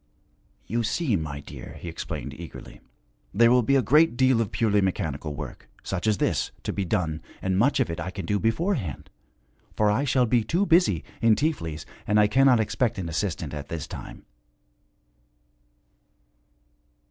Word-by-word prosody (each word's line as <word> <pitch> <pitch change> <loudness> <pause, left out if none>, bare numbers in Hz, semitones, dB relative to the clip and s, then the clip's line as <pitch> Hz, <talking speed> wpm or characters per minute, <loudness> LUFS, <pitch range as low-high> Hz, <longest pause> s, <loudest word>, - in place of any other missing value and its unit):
'You 115 +4 -1
see, 115 +3 0
my 75 -4 -4
dear,' - - -10
he - - -8
explained 85 - -5
eagerly, - - -10 0.5
'there 115 +2 +6
will 125 0 +5
be 140 +4 +2
a 135 - +3
great 150 -1 +4
deal 130 -3 +4
of 110 - -2
purely 105 -3 +2
mechanical 80 -5 -2
work, - - -8
such 95 +2 -3
as 105 -2 +3
this, - - 0
to - - -2
be 100 - -1
done, 80 -3 -1 0.2
and 95 -1 -1
much 120 +9 +3
of - - +2
it 85 - -5
I 95 - -3
can 95 -1 -6
do 105 +3 0
beforehand. 115 - -1 0.6
For 105 -1 +3
I 120 +7 +1
shall 130 -2 +3
be 120 0 +2
too 175 - +1
busy, 165 - +3 0.2
in 115 -1 +5
Tiflis, 80 - -2 0.2
and 105 +1 +3
I 105 - +6
cannot 125 +3 +4
expect 110 +2 0
an 90 -3 -4
assistant 80 -2 -2
at 70 -1 -6
this 80 -4 -4
time.' - - -9
105 Hz, 170 wpm, -26 LUFS, 85-125 Hz, 0.6 s, there